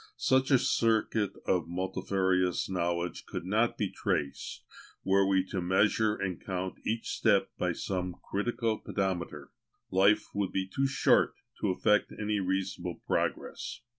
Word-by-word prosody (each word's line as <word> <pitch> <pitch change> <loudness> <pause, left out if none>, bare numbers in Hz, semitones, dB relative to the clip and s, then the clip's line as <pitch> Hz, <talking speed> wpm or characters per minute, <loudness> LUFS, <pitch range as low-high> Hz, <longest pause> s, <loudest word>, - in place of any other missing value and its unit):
Such 130 +1 +2
a 135 - +6
circuit 110 -3 +1
of 90 -4 +1
multifarious 95 0 0
knowledge 85 -2 -2
could - - -5
not 110 +5 +1
be 105 -4 -1
traced 70 -2 -2 0.4
were 95 0 +3
we 95 -1 +3
to 95 - -2
measure 105 +4 +2
and 95 -4 -4
count 95 -1 -4
each 115 +1 -2
step - - +2
by - - +1
some 90 -2 -3
critical 115 +1 -1
pedometer; 95 -4 -3 0.4
life 100 +3 +4
would 100 -2 -1
be 95 -1 -1
too 135 +8 0
short 135 0 +3 0.2
to - - 0
effect 105 +3 +2
any 105 -1 0
reasonable 95 -2 -2
progress. - - -2
95 Hz, 135 wpm, -30 LUFS, 90-105 Hz, 0.4 s, a